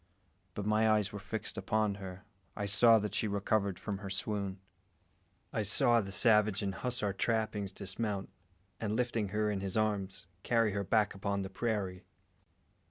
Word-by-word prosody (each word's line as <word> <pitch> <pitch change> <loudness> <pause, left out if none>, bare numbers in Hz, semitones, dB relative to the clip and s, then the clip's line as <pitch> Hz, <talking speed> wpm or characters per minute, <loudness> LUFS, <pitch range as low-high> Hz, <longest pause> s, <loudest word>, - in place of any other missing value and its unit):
But 100 - -3
my 110 +1 +3
eyes 105 -2 +2
were 105 - -6
fixed 105 +3 -4
upon 110 -1 +1
her 95 -1 -8 0.3
I 105 - -2
saw 115 +3 +6
that 105 -2 -2
she 110 - +1
recovered 100 -1 0
from 100 -1 -4
her 100 -1 -6
swoon. 100 0 -2 0.9
I - - 0
saw 120 +3 +4
the 95 -1 -7
savage 105 0 +4
in 100 - 0
hussar 105 -2 -1
trappings 110 -2 -1
dismount, 100 0 -4 0.5
and, 110 -1 -1
lifting 115 -3 0
her 105 +2 0
in 100 - -2
his 95 +1 -2
arms, 100 -4 -1 0.2
carry 115 -1 +2
her 100 0 -1
back 105 +2 +2
upon 100 0 -2
the 95 - -6
prairie. 100 -4 -2
105 Hz, 165 wpm, -33 LUFS, 100-110 Hz, 0.9 s, saw